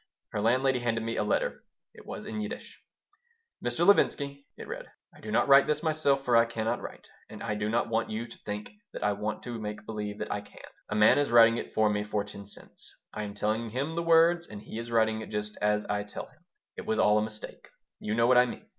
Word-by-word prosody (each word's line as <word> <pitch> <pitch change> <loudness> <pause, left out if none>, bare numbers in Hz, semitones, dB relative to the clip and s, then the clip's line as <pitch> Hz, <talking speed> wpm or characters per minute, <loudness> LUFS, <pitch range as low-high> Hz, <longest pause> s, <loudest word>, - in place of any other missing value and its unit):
Her 105 - -2
landlady 130 +3 +2
handed 115 -2 -1
me 115 0 -2
a - - 0
letter. - - -1 0.3
It - - -15
was 215 - -7
in 215 0 -4
Yiddish: 210 +3 -7 0.8
Mr. 120 +8 0
Levinsky 140 -7 +2
[it - - -9
read], - - -6 0.3
I - - -17
do 110 - -8
not 110 - +2
write 135 0 +7
this 150 +1 0
myself, 145 -4 +1
for 120 - +3
I 115 0 +6
cannot 115 0 -2
write, - - -9 0.2
and - - -9
I 110 - -1
do 105 0 -2
not 115 +2 +1
want 115 0 0
you 110 +2 -3
to 120 - -12
think 105 0 -6 0.2
that - - -5
I 105 - +2
want 105 +1 -4
to 120 -2 -5
make 105 0 -6
believe 105 -2 -5
that 105 - -5
I 105 - -2
can. 100 - -14 0.2
A 105 - -2
man 105 +6 +6
is 145 - +1
writing 115 0 +7
it - - -5
for 110 0 +4
me 105 0 0
for 105 -1 -1
ten 100 -1 -10
cents. - - -14 0.2
I - - -4
am 100 -1 -5
telling 110 +2 -1
him 135 +8 -2
the 170 - -1
words 170 +1 +4
and 105 - -8
he 110 +2 -7
is 115 0 -6
writing 110 -1 +1
just 105 0 -3
as 105 0 +1
I 105 0 -1
tell 105 0 -7
him. - - -25 0.3
It - - -7
was 110 - +1
all 105 0 +4
a - - 0
mistake. 110 0 -8 0.3
You 105 - -2
know 115 0 +3
what 125 0 +6
I 125 - +5
mean. - - -8
115 Hz, 245 wpm, -29 LUFS, 105-130 Hz, 0.8 s, write